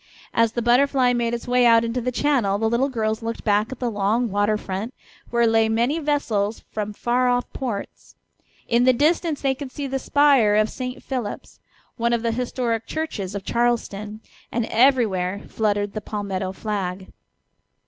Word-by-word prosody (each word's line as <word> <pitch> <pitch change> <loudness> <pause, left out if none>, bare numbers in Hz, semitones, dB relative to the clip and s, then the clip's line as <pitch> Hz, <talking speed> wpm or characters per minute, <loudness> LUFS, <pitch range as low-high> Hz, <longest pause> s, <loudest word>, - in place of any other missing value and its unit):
As 230 -1 +2
the 240 - -2
Butterfly 250 +1 +3
made 240 -1 0
its 235 - -8
way 250 0 +3
out 230 -1 +6
into 230 +2 -2
the 250 +2 -1
channel 245 -7 +1
the 220 +2 0
little 240 +5 +1
girls 220 -3 -1
looked 230 0 -5
back 210 +2 +1
at 260 - -6
the 245 -2 -2
long 210 +3 0
water 205 +1 +1
front, 205 +5 -5 0.3
where 235 0 +2
lay 225 -1 +3
many 240 +8 +1
vessels 230 -9 -1
from 210 -1 -3
far 245 +4 +1
off 245 0 +1
ports. 230 -7 -6 0.5
In 240 +1 +3
the 255 - +6
distance 310 +3 +1
they 270 -1 +2
could 265 0 -8
see 285 - -5
the 270 0 -2
spire 275 -8 +4
of 215 +1 +2
St. 250 -1 -6
Philip's, 250 -6 -5 0.4
one 235 0 +1
of 235 -1 0
the 230 - +1
historic 235 -1 -2
churches 210 -12 -4
of 195 -1 -5
Charleston, 220 -3 -1 0.3
and 235 -1 -1
everywhere 215 -7 +2
fluttered 205 -2 -1
the 215 - -4
palmetto 195 -3 -3
flag. 190 -2 -4
230 Hz, 175 wpm, -23 LUFS, 210-250 Hz, 0.5 s, out